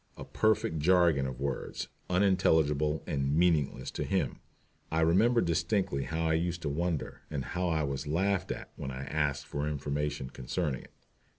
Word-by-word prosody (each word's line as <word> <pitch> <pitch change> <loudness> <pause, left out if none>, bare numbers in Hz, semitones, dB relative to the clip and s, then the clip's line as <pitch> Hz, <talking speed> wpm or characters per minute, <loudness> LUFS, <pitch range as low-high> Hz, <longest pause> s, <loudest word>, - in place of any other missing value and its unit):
A - - -7
perfect 110 -7 +1
jargon 85 -4 +4
of 65 -1 -6
words, 70 -1 -3 0.2
unintelligible 80 -6 +3
and 70 0 0
meaningless 80 -6 +2
to - - -3
him! - - -1 0.5
I 80 +1 +1
remember 110 +9 +4
distinctly 85 -3 0
how 80 +1 -2
I 80 - +2
used 85 +1 -1
to 75 - 0
wonder, 85 +1 -2
and 70 -4 -3
how 90 0 -1
I 80 -2 +1
was 70 0 -3
laughed 95 +4 +1
at - - -6
when - - -5
I 65 0 -5
asked 70 -1 -1
for 70 +1 -3
information 75 -2 -2
concerning 65 +1 -2
it. - - -17
80 Hz, 165 wpm, -30 LUFS, 70-90 Hz, 0.5 s, jargon